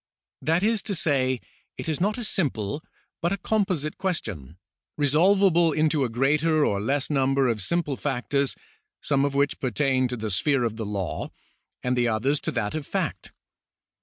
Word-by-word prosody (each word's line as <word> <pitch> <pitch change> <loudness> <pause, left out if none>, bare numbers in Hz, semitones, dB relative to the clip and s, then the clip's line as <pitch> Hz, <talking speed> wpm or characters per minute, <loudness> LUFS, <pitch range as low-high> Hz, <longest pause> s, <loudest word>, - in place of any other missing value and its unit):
That 165 +4 +1
is 220 -1 +2
to 200 - 0
say, 130 -6 +1 0.4
it - - -6
is 160 0 -1
not 210 +4 +1
a 240 - -3
simple, 145 - -1 0.4
but 170 +1 +1
a 200 - 0
composite 185 -7 -1
c[uestion, 100 - -3 0.4
resolvable 170 +3 +4
into 155 -1 +2
a 125 - 0
greater 150 +6 +2
or 100 -1 0
less 140 +6 -1
number 135 -1 +2
of 115 -3 0
simple 150 - -1
factors, 140 +1 -1 0.4
some 140 -1 +1
of 140 -1 -2
which 140 0 +1
pertain 130 +1 +1
to 125 0 -4
the 110 -1 -3
sphere 135 +7 +2
of 110 -2 -2
the 110 -2 -4
law 100 -5 -3 0.5
and 125 0 +1
the 120 -1 +2
others 125 +6 +1
to - - -2
that 105 - -2
of 155 -2 -4
fact. - - -3
140 Hz, 170 wpm, -25 LUFS, 125-160 Hz, 0.5 s, resolvable